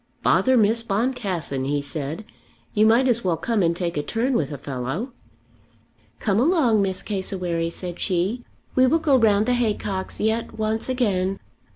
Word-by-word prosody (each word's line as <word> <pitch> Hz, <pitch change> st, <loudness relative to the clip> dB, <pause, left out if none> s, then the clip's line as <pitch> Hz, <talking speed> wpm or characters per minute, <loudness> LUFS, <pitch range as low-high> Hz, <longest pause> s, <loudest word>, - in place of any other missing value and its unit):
"Bother 260 Hz, -1 st, +4 dB
Miss 225 Hz, +1 st, +3 dB
Boncassen," 200 Hz, -, -2 dB
he 145 Hz, +1 st, 0 dB
said; 145 Hz, +6 st, -5 dB, 0.5 s
"you 215 Hz, 0 st, +4 dB
might 240 Hz, +4 st, +4 dB
as 235 Hz, -2 st, +1 dB
well 175 Hz, -3 st, +1 dB
come 220 Hz, +5 st, 0 dB
and 170 Hz, -1 st, +2 dB
take 170 Hz, -2 st, -2 dB
a -, -, +1 dB
turn 235 Hz, -, -1 dB
with 155 Hz, -, 0 dB
a 145 Hz, -, -5 dB
fellow." 140 Hz, -, -4 dB, 1.0 s
"Come 205 Hz, -3 st, +1 dB
along, 260 Hz, -, +3 dB
Miss 190 Hz, -1 st, -1 dB
Cassewary," 180 Hz, -4 st, -2 dB
said 175 Hz, 0 st, -6 dB
she. 195 Hz, +6 st, -1 dB, 0.3 s
"We 255 Hz, 0 st, +4 dB
will 320 Hz, -, +4 dB
go 310 Hz, -4 st, +2 dB
round 215 Hz, -4 st, +4 dB
the 250 Hz, -, +2 dB
haycocks 210 Hz, -5 st, -2 dB
yet 220 Hz, +2 st, -1 dB
once 220 Hz, +2 st, -1 dB
again." 195 Hz, -7 st, 0 dB
205 Hz, 165 wpm, -23 LUFS, 175-235 Hz, 1.0 s, Bother